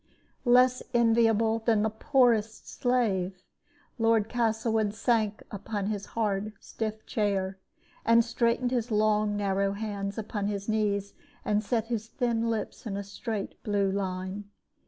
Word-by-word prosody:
Less 250 +1 +5
enviable 225 -1 +3
than 225 -2 +2
the 220 - +1
poorest 225 -2 +2
slave, 195 -7 0 0.6
Lord 225 -1 +3
Castlewood 220 -2 0
sank 215 -1 +1
upon 205 0 -4
his 205 -2 -4
hard 210 -1 0
stiff 215 -1 -5
chair, 195 -3 -1 0.4
and 230 0 +5
straightened 235 +1 +1
his 245 -1 -1
long 210 -1 +2
narrow 195 -1 0
hands 200 -1 -4
upon 205 -2 -3
his 200 -1 -3
knees, 205 -2 0 0.3
and 210 0 +1
set 225 +1 0
his 225 -2 -2
thin 230 -2 0
lips 225 +2 -3
in 200 -1 -3
straight 205 +1 -5
blue 200 -2 +1
lines. 190 +1 -3
215 Hz, 130 wpm, -28 LUFS, 200-230 Hz, 0.6 s, Less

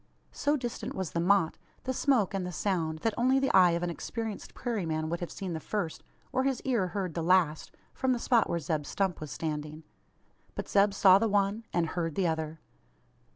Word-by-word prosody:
So 295 +1 +1
distant 240 -3 -5
was 190 -5 -3
the 170 - -1
"motte," 180 -1 +2 0.2
the 260 - -1
smoke, 250 -8 +2
and 195 -1 -1
the 180 - -4
sound, 165 -4 -1
that 225 - +1
only 255 +3 +3
the 270 0 +2
eye 180 -2 +6
of 170 - -4
an 175 - -1
experienced 220 +4 -5
prairie 235 -5 -2
man 155 -1 -2
would 170 +1 -2
have 175 - -5
seen 190 -3 -5
the 160 - -3
first, 175 -1 -3 0.3
or 260 +1 +1
his 270 -2 0
ear 235 -8 +1
heard 185 -2 -3
the 170 - -2
last, 165 -3 +2 0.2
from 260 - 0
the 250 - +2
spot 235 -1 +2
where 170 - 0
Zeb 155 -2 -2
Stump 190 -5 -1
was 155 - -5
standing. 155 0 -4 0.7
But - - -4
Zeb 200 0 +3
saw 190 -1 +7
the 225 +1 +1
one, 205 +2 +1
and 175 -1 +1
heard 165 -3 -2
the 190 - +1
other. 160 -1 -1
185 Hz, 210 wpm, -29 LUFS, 165-225 Hz, 0.7 s, saw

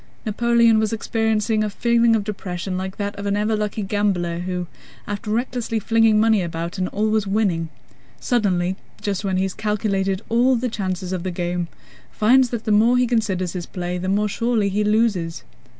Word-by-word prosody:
Napoleon 235 +1 +3
was 220 -1 0
experiencing 220 -1 0
a 210 - -1
feeling 235 +2 +3
of 215 - 0
depression 190 -3 -4
like 190 +1 -4
that 205 0 -3
of 200 0 -4
an 200 0 +1
ever 215 +1 +1
lucky 210 0 -2
gambler 190 -4 0
who, 180 0 -3 0.4
after 205 +2 -5
recklessly 235 0 -1
flinging 225 0 +3
money 220 -2 +4
about 170 +1 -4
and 185 - 0
always 215 0 0
winning, 190 -6 0 0.5
suddenly 190 -6 0 0.2
just 200 -1 -2
when 190 -2 0
he 190 - +1
has 190 -1 -2
calculated 200 -2 -1
all 245 +3 +3
the 250 +1 -1
chances 185 -3 -3
of 185 - -2
the 185 - -3
game, 175 -1 -2 0.4
finds 250 +4 +4
that 230 -2 -4
the 215 - -1
more 225 +4 +5
he 250 - +3
considers 210 -7 0
his 180 -2 -5
play 180 0 -4
the 185 +1 -3
more 205 +2 +2
surely 225 -1 0
he 205 +2 0
loses. 210 -6 +1
210 Hz, 180 wpm, -22 LUFS, 185-225 Hz, 0.5 s, more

